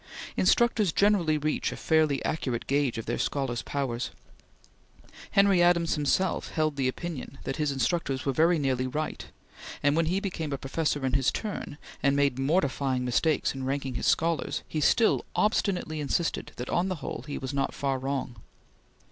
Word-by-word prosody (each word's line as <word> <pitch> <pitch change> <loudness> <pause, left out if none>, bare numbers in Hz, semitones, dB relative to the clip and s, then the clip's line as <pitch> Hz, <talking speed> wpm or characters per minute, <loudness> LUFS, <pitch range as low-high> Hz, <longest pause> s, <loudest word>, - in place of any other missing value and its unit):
Instructors 230 -6 +3
generally 185 -5 +3
reach 150 +1 -1
a - - -6
fairly 155 -4 +2
accurate 125 -6 -2
gauge 140 -3 +1
of 115 - -4
their 120 - -2
scholars' 130 -5 -1
powers. 130 -4 -2 1.2
Henry 200 -2 +4
Adams 175 -1 +4
himself 150 +5 0
held 155 -2 +1
the 135 -2 0
opinion 135 -1 -5
that 135 - -3
his 150 -2 0
instructors 135 +1 -1
were 135 - +1
very 165 +4 +4
nearly 130 -3 0
right, 155 +4 -4 0.6
and 145 +1 +3
when 165 0 +2
he 185 +4 +1
became 170 -6 -4
a - - -1
professor 145 +1 -1
in 130 - -1
his 135 -1 +3
turn, 205 -8 -5 0.2
and 140 +1 +3
made 140 -2 +2
mortifying 135 -4 +1
mistakes 150 +5 +1
in 135 -1 -6
ranking 135 0 -2
his 120 - -2
scholars, 165 0 +1
he 155 - -2
still 225 - +3
obstinately 185 -7 +1
insisted 150 +3 -1
that 125 - -5
on 175 +2 +1
the 185 - -1
whole, 145 - -6
he 145 - -4
was 130 +1 -5
not 140 -1 0
far 135 -2 -1
wrong. 135 -2 -3
145 Hz, 170 wpm, -28 LUFS, 135-165 Hz, 1.2 s, Henry